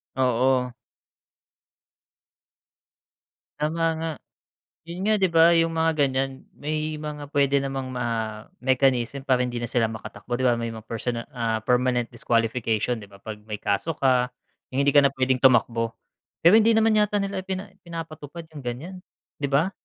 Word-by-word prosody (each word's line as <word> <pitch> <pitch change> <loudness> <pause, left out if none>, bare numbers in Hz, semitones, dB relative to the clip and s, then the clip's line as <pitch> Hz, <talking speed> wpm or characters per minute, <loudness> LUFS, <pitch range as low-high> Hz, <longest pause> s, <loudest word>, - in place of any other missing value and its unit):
Oo. 125 0 +2 2.9
Tama 165 +2 0
nga. 165 0 -2 0.7
Yun 175 +4 -5
nga 215 - +4
'di 190 -4 +1
ba 165 +1 +6
yung 165 0 +3
mga 165 0 +2
ganiyan, 135 -2 0 0.2
may 155 +1 -2
mga 150 -1 -6
puwede 140 -1 +2
namang 135 -1 -3
ma 115 -3 -3 0.2
mechanism 130 0 +1
para 130 -2 +2
hindi 120 -1 -2
na 120 - -2
sila 115 -1 +1
makatakbo 110 +2 -6
'di 130 - -2
ba 120 - +4
may 115 - -2
mga 110 - -9
personal 115 +1 -3
ah, 115 -3 -1
permanent 125 0 +2
disqualification 115 0 0
'di 105 - -11
ba, 100 - -17
'pag 105 +1 -8
may 105 - -3
kaso 105 +12 -1
ka, 130 -2 +3 0.4
yung 135 +2 +1
hindi 145 - +4
ka 145 - +7
na - - -4
puwedeng 130 -1 +1
tumakbo. 115 -3 +3 0.5
Pero 175 +6 +8
hindi 225 +1 +4
naman 220 -1 +4
yata 210 0 +1
nila 195 -1 -2
pina 190 +1 -3 0.2
pinapatupad 165 -1 -7
yung 145 -3 -9
ganiyan 130 +10 -5 0.4
di 140 - -1
ba? 150 +8 +2
130 Hz, 155 wpm, -25 LUFS, 120-160 Hz, 2.9 s, Pero